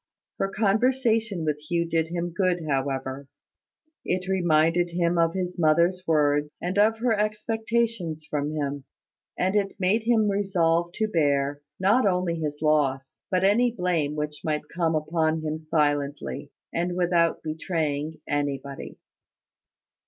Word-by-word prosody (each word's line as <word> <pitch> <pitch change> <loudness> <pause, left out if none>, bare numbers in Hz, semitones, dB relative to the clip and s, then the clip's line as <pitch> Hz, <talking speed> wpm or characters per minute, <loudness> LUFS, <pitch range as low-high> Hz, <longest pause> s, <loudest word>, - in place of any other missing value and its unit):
Her 195 - +1
conversation 220 -2 +1
with 150 -1 -1
Hugh 170 +3 -1
did 165 -1 0
him 170 0 -3
good, 180 -3 +1
however. 135 -1 -2 0.8
It 185 0 -2
reminded 175 -2 +2
him 170 0 +1
of 165 0 +3
his 180 -1 -3
mother's 170 +3 +3
words, 150 -1 +2
and 185 +3 -1
of 220 +2 +4
her 230 -1 +1
expectations 215 -5 -1
from 145 0 -2
him; 145 -2 -3 0.5
and 190 +2 +1
it 200 -1 0
made 195 +5 +2
him 225 -3 +3
resolve 175 -4 +1
to 220 - 0
bear, 145 -5 +1 0.2
not 205 +5 +3
only 180 -2 +1
his 150 -1 -4
loss, 140 -3 +1
but 185 -1 +1
any 220 +6 +4
blame 175 -9 -1
which 150 0 -4
might 150 -1 -2
come 165 -2 +1
upon 160 +1 0
him 155 0 -2
silently, 145 -2 -1 0.2
and 175 +1 -1
without 175 -2 +2
betraying 155 -1 -2
anybody. 140 -1 -3
170 Hz, 135 wpm, -26 LUFS, 150-190 Hz, 0.8 s, of